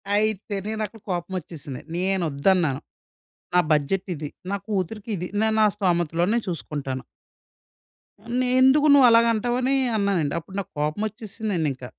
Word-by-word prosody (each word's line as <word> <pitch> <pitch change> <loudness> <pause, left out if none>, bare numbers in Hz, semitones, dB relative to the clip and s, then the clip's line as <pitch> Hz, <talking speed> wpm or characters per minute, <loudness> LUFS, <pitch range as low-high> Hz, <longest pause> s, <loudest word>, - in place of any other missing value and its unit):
అయితే 215 -1 0
నేనక్కడ 220 0 -4
కోపమొచ్చేసింది. 170 -6 -5
నేనొద్దన్నాను. 175 -4 +1 0.7
నా 180 - +5
బడ్జెట్ 155 +7 +1
ఇది 150 0 -5 0.2
నా 200 - 0
కూతురికిది 200 -1 -3
నేను 220 0 +2
ఆ - - +6
స్తోమతలోనే 175 +1 +1
చూసుకుంటాను. 140 -6 -4 1.4
నే 255 - +1
ఎందుకు 290 +3 +5
నువ్వలాగ 235 -4 +7
అంటావని 245 +4 0 0.2
అన్నానండి. 195 -8 +1
అప్పుడు 190 +4 -13
నాకు 195 0 -6
కోపమొచ్చేసిందండింక. 190 - -2
190 Hz, 105 wpm, -24 LUFS, 160-220 Hz, 1.4 s, నువ్వలాగ